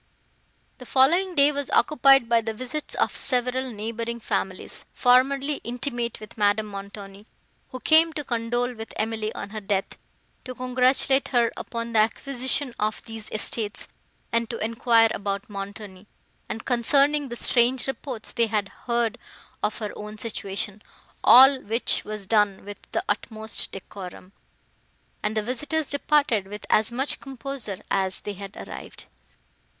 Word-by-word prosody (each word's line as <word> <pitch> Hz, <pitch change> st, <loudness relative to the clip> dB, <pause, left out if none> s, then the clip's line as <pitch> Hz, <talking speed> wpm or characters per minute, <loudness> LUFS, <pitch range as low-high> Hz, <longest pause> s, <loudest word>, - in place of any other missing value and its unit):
The 250 Hz, -, -11 dB
following 345 Hz, +8 st, +3 dB
day 285 Hz, 0 st, +6 dB
was 285 Hz, -1 st, -3 dB
occupied 270 Hz, -4 st, +5 dB
by 235 Hz, -1 st, +4 dB
the 225 Hz, 0 st, -4 dB
visits 255 Hz, +6 st, -4 dB
of -, -, 0 dB
several 255 Hz, +1 st, 0 dB
neighbouring 230 Hz, +2 st, -4 dB
families, 190 Hz, -4 st, -3 dB
formerly 270 Hz, +3 st, +3 dB
intimate 240 Hz, -1 st, -3 dB
with 215 Hz, +1 st, -12 dB
Madame 205 Hz, +1 st, +3 dB
Montoni, 200 Hz, 0 st, -9 dB, 0.4 s
who 255 Hz, -, -7 dB
came 320 Hz, +4 st, +5 dB
to 300 Hz, -, -4 dB
condole 240 Hz, 0 st, -1 dB
with 225 Hz, -1 st, -8 dB
Emily 220 Hz, 0 st, -2 dB
on -, -, -6 dB
her 215 Hz, 0 st, -5 dB
death, 195 Hz, -1 st, -2 dB, 0.5 s
to 255 Hz, -1 st, -6 dB
congratulate 255 Hz, +2 st, +2 dB
her 240 Hz, -3 st, +2 dB
upon 230 Hz, 0 st, -5 dB
the 220 Hz, -, +4 dB
acquisition 255 Hz, +3 st, 0 dB
of 215 Hz, +1 st, -1 dB
these 225 Hz, -2 st, -8 dB
estates, 215 Hz, 0 st, -2 dB, 0.4 s
and 230 Hz, 0 st, 0 dB
to 235 Hz, -, -4 dB
enquire 230 Hz, 0 st, +3 dB
about 200 Hz, -1 st, -3 dB
Montoni, 200 Hz, -1 st, -8 dB, 0.4 s
and 220 Hz, -, -5 dB
concerning 280 Hz, +4 st, +3 dB
the 240 Hz, -, -5 dB
strange 245 Hz, +1 st, +2 dB
reports 265 Hz, -4 st, -4 dB
they 230 Hz, -1 st, +2 dB
had 210 Hz, -2 st, -1 dB, 0.2 s
heard 235 Hz, -1 st, 0 dB, 0.4 s
of 210 Hz, -, -1 dB
her 210 Hz, -2 st, -4 dB
own 210 Hz, +1 st, -8 dB
situation; 205 Hz, -2 st, -3 dB, 0.4 s
all 265 Hz, +1 st, +8 dB
which 225 Hz, +4 st, +1 dB
was 215 Hz, -2 st, -5 dB
done 205 Hz, -2 st, +2 dB
with 205 Hz, 0 st, -8 dB
the 340 Hz, -, -1 dB
utmost 220 Hz, -, -3 dB
decorum, 185 Hz, -1 st, -9 dB, 0.9 s
and 215 Hz, +1 st, -1 dB
the 215 Hz, -, +1 dB
visitors 290 Hz, +6 st, -2 dB
departed 285 Hz, -8 st, +2 dB
with 210 Hz, +1 st, -8 dB
as 220 Hz, +2 st, +4 dB
much 265 Hz, +4 st, -1 dB
composure 270 Hz, -6 st, -6 dB
as 190 Hz, -1 st, 0 dB
they 205 Hz, -, -5 dB
had 200 Hz, 0 st, -9 dB
arrived. -, -, -9 dB
230 Hz, 145 wpm, -25 LUFS, 210-260 Hz, 0.9 s, all